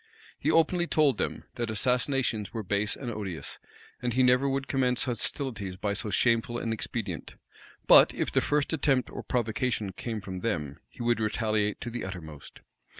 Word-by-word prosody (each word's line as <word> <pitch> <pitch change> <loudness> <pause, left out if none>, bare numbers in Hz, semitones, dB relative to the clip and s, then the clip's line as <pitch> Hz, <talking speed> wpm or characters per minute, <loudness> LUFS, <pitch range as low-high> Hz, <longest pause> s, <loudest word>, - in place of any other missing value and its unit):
He 150 - 0
openly 170 +2 +3
told 150 -5 +3
them, - - -2
that 120 -2 -2
assassinations 125 -1 0
were 110 -2 -4
base 100 +2 0
and 125 -3 -5
odious, 100 -6 -6 0.4
and 120 -1 -1
he 130 +2 +3
never 125 +2 +4
would 135 0 -1
commence 125 -2 +1
hostilities 115 -5 -2
by 100 +1 -1
so 100 +1 -3
shameful 115 +2 +2
an 115 -1 -2
expedient; 105 -5 -4 0.5
but - - +8
if - - -2
the - - +3
first 145 +1 0
attempt 135 -5 +1
or - - -6
provocation 115 -3 -1
came 110 +3 -4
from 95 -2 -6
them, 75 -10 -2
he - - -8
would 120 -1 +2
retaliate 110 -1 0
to 120 - -4
the 120 - -4
uttermost. 80 -6 -8
115 Hz, 170 wpm, -28 LUFS, 105-125 Hz, 0.5 s, but